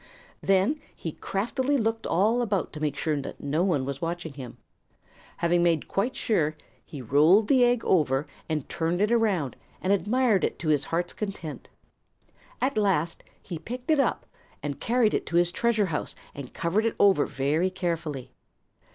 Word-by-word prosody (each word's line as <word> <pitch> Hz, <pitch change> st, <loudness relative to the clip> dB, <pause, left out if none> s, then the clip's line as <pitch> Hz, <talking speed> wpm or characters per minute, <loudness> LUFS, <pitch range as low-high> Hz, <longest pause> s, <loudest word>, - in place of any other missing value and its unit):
Than 195 Hz, +10 st, +2 dB
he 165 Hz, -, -5 dB
craftily 255 Hz, -, -1 dB
looked 225 Hz, -1 st, -1 dB
all 220 Hz, +7 st, +2 dB
about 205 Hz, -6 st, -1 dB
to 155 Hz, -, -6 dB
make 150 Hz, -2 st, -1 dB
sure 150 Hz, -1 st, -1 dB
that -, -, -8 dB
no 145 Hz, +3 st, -1 dB
one 160 Hz, -9 st, +1 dB
was 140 Hz, 0 st, -5 dB
watching 165 Hz, -2 st, -3 dB
him. 130 Hz, -4 st, -9 dB, 0.8 s
Having 170 Hz, +1 st, +2 dB
made 170 Hz, -3 st, +2 dB
quite 230 Hz, +7 st, -1 dB
sure, 155 Hz, -9 st, +1 dB, 0.3 s
he 140 Hz, -4 st, -9 dB
rolled 155 Hz, -, +5 dB
the 260 Hz, -1 st, +5 dB
egg 245 Hz, -1 st, +2 dB
over 145 Hz, -5 st, +2 dB, 0.2 s
and 155 Hz, -3 st, -2 dB
turned 165 Hz, +2 st, -1 dB
it 210 Hz, +3 st, +2 dB
around 200 Hz, -, +1 dB, 0.2 s
and 190 Hz, +2 st, +1 dB
admired 215 Hz, 0 st, +2 dB
it -, -, 0 dB
to 160 Hz, -, -3 dB
his 145 Hz, -2 st, +3 dB
heart's 175 Hz, +1 st, -1 dB
content. 195 Hz, -7 st, -6 dB, 0.9 s
At 260 Hz, -4 st, +1 dB
last 175 Hz, -5 st, +1 dB, 0.2 s
he 170 Hz, -4 st, -6 dB
picked 250 Hz, -, -4 dB
it 310 Hz, -, +4 dB
up -, -, +1 dB, 0.4 s
and 145 Hz, -2 st, -4 dB
carried 235 Hz, -2 st, +2 dB
it -, -, -1 dB
to 170 Hz, -, -3 dB
his 175 Hz, 0 st, +4 dB
treasure 220 Hz, +1 st, +2 dB
house 150 Hz, -, -2 dB, 0.2 s
and 140 Hz, -3 st, -8 dB
covered 200 Hz, +7 st, 0 dB
it 230 Hz, -, -2 dB
over 195 Hz, -7 st, +5 dB
very 150 Hz, +7 st, 0 dB
carefully. 165 Hz, -7 st, -3 dB
175 Hz, 170 wpm, -27 LUFS, 155-215 Hz, 0.9 s, rolled